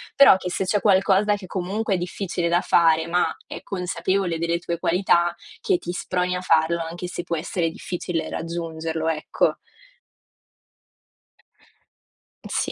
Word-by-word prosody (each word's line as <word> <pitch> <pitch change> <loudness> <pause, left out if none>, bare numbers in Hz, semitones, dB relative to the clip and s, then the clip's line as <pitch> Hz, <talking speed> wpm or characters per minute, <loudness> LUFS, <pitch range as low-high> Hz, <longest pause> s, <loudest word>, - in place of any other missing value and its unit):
però 275 -9 +8
che 180 - -5
se 190 - -1
c'è 205 +2 +1
qualcosa 200 +1 +3
che 195 -2 -9
comunque 195 +3 -2
è - - 0
difficile 175 0 -3
da 175 +1 +2
fare, 160 -1 +3
ma 175 +1 +2 0.2
è - - -7
consapevole 185 -1 -1
delle 170 +1 0
tue 170 0 -3
qualità, 175 0 +2 0.3
che 390 -6 +2
ti 175 - -5
sproni 180 0 -1
a 180 - -3
farlo 165 -1 +2
anche 175 +2 -6
se 175 0 -5
può 170 - -2
essere 165 +1 -1
difficile 175 -1 -4
raggiungerlo, 165 -1 -3
ecco. 155 -1 0 2.9
Sì, - - -1
175 Hz, 140 wpm, -23 LUFS, 170-190 Hz, 2.9 s, però